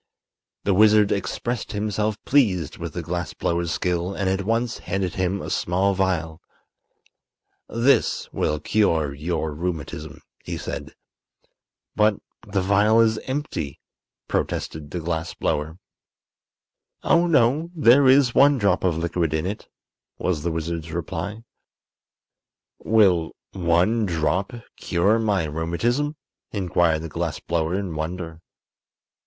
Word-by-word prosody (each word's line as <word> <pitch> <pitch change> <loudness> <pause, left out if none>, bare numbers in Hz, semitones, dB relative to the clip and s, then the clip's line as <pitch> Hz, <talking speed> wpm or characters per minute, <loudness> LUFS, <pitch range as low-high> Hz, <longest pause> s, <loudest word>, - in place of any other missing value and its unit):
The 100 - +2
wizard 105 +1 +5
expressed 120 +4 -2
himself 105 0 -1
pleased 100 - +2
with - - -5
the - - -4
glass - - -4
blower's 85 0 -1
skill 90 +2 -1
and 100 - -1
at 95 +1 +1
once 115 +2 0
handed 95 -1 -2
him 95 +1 -1
a - - -5
small 95 +3 +1
vial. 90 -4 -1 1.3
"This 120 +4 +2
will 75 0 0
cure 80 -9 +1
your 80 +1 -2
rheumatism," 80 -2 -5 0.2
he - - -4
said. - - -6 1.0
"But 105 0 +4 0.3
the 100 -1 0
vial 105 +3 +4
is 110 -1 +3
empty!" 130 - -3 0.5
protested 75 -2 -3
the 90 - -4
glass 80 0 -3
blower. 75 +3 -2 1.3
"Oh, 170 +1 +4
no; 150 +2 +3
there 140 -2 +6
is 130 -2 +5
one 140 +1 +5
drop 100 -4 +1
of 90 -4 +1
liquid 85 -1 -1
in 80 +2 -1
it," 100 +3 -5 0.5
was 90 -5 -1
the 85 - -1
wizard's 80 0 -4
reply. 95 +6 -4 1.4
"Will 95 -7 +3 0.2
one 95 +5 +2
drop 85 +3 0 0.3
cure 100 +6 +2
my 105 -5 +1
rheumatism?" 85 - -1 0.4
inquired 85 -5 +1
the - - -4
glass - - -3
blower, 85 +1 -1
in 95 -4 -3
wonder. 80 +1 -5
95 Hz, 125 wpm, -23 LUFS, 80-110 Hz, 1.4 s, there